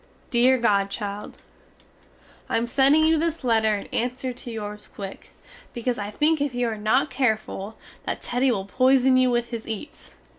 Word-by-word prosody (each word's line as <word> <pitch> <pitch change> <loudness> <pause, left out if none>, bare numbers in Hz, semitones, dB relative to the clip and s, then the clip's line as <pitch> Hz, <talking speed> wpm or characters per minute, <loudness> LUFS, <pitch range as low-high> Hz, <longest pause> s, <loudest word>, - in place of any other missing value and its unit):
Deer 255 +1 +5
godchild, 205 -2 -1 1.1
I - - +1
am 230 - 0
sending 275 +5 +4
you 320 0 +4
this 330 -2 -2
letter 220 -3 +3
in 200 - -7
anser 250 +1 -2
to 245 0 -9
yours 210 -2 -6
quick, 195 -1 -8 0.5
becaus 240 0 -2
I 205 0 -4
think 300 +7 +1
if 285 -3 -1
you 245 -1 0
are 220 - -3
not 220 +7 +1
careful 220 -5 -1 0.3
that - - -2
Teddy 250 +2 +1
will 195 -5 -2
poison 260 +4 +4
you 255 0 +4
with 240 -1 0
his 230 -2 -5
eats. 225 +6 -8
240 Hz, 170 wpm, -24 LUFS, 215-260 Hz, 1.1 s, Deer